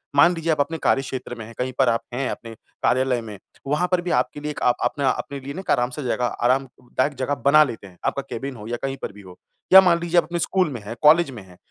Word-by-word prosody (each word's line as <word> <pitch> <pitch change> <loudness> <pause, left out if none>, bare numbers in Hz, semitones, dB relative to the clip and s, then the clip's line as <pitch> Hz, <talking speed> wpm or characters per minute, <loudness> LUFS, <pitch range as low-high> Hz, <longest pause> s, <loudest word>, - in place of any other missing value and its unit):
मान 170 +5 +6
लीजिए 165 0 -1
आप 155 - 0
अपने 160 +3 0
कार्यक्षेत्र 130 -2 -1
में 115 - -8
हैं, 115 - -12
कहीं 125 +1 -2
पर 130 -2 +5
आप 115 0 +1
हैं 130 +1 -1
अपने 115 -1 -7 0.3
कार्यालय 130 -1 +2
में 105 -3 -9 0.3
वहाँ 150 +6 +1
पर 180 -1 +2
भी 175 0 -3
आपके 125 +4 0
लिए 150 +1 -4
एक 150 - -8
आप 125 - +4
अपने 140 -2 0
अपने 140 +2 -1
लिए 135 +1 -7
ना 190 - -6
आराम 125 0 +1
से 135 +3 -6
जगह 125 0 0
आरामदायक 130 +3 -1
जगह 140 +2 0
बना 155 +2 +7
लेते 115 -8 -6
हैं। 90 -2 -18
आपका - - 0
केबिन 135 +3 -5
हो 105 -2 -9
या 120 +1 -3
कहीं 135 0 -2
पर - - -4
भी 105 - -13
हो। 90 -2 -14 0.4
या 190 - +12
मान 175 -2 +3
लीजिए 170 0 0
आप 170 - +6
अपने 170 +2 -4
स्कूल 185 0 +1
में 120 -5 -6
हैं, 105 +3 -7
कॉलेज 160 +2 +6
में 115 -6 -9
हैं 90 -1 -17
135 Hz, 265 wpm, -23 LUFS, 120-155 Hz, 0.4 s, या